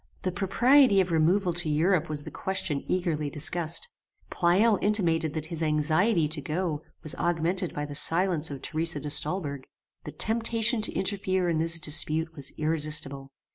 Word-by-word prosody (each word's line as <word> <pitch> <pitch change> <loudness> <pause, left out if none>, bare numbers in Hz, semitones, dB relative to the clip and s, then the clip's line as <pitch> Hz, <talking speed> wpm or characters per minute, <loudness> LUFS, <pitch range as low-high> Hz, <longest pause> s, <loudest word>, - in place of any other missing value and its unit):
"The 185 - -1
propriety 205 +5 +3
of 185 -2 0
removal 175 +3 +2
to 170 -2 -1
Europe 165 +2 +1
was 150 -1 0
the - - -9
question 180 -6 -3
eagerly 160 -5 -1
discussed. 160 - -1 0.4
Pleyel 195 +5 +2
intimated 165 -7 0
that 155 -1 -4
his 165 - -5
anxiety 155 +4 +1
to 155 0 -2
go 155 +1 -3 0.2
was 155 - +2
augmented 175 +2 -1
by 145 - -3
the 145 - -8
silence 165 +1 +2
of 140 -2 -8
Theresa 160 -1 -1
de 145 +1 -6
Stolberg. 145 -4 -2 0.4
The - - -6
temptation 230 +1 0
to 215 - +3
interfere 190 -2 0
in 165 -2 0
this 165 +1 +1
dispute 160 +1 0
was 140 -4 -1
irresistible. 150 -3 0
165 Hz, 160 wpm, -27 LUFS, 150-190 Hz, 0.4 s, propriety